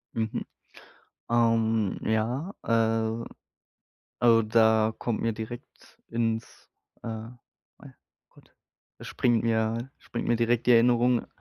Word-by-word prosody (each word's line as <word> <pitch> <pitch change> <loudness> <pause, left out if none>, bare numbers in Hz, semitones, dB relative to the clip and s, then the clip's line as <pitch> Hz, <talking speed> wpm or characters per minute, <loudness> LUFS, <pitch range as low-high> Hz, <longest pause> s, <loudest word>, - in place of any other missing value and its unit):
Mhm. 110 -1 -2 0.8
Ähm, 115 -3 +2
ja. 120 - -1
Äh, 115 0 0 0.9
also, 115 -1 +5
da 110 0 +3
kommt 115 -3 -2
mir 115 -1 0
direkt 110 +2 -10
ins 115 -1 -3 0.3
äh, - - -6
ja 115 +2 -7 0.9
gut, - - -23 0.4
da - - -12
springt 120 -3 +1
mir 115 +2 -1
springt 120 +1 -6
mir 120 - +3
direkt 120 0 +1
die - - +7
Erinnerung 120 +1 +3
115 Hz, 110 wpm, -27 LUFS, 110-120 Hz, 0.9 s, die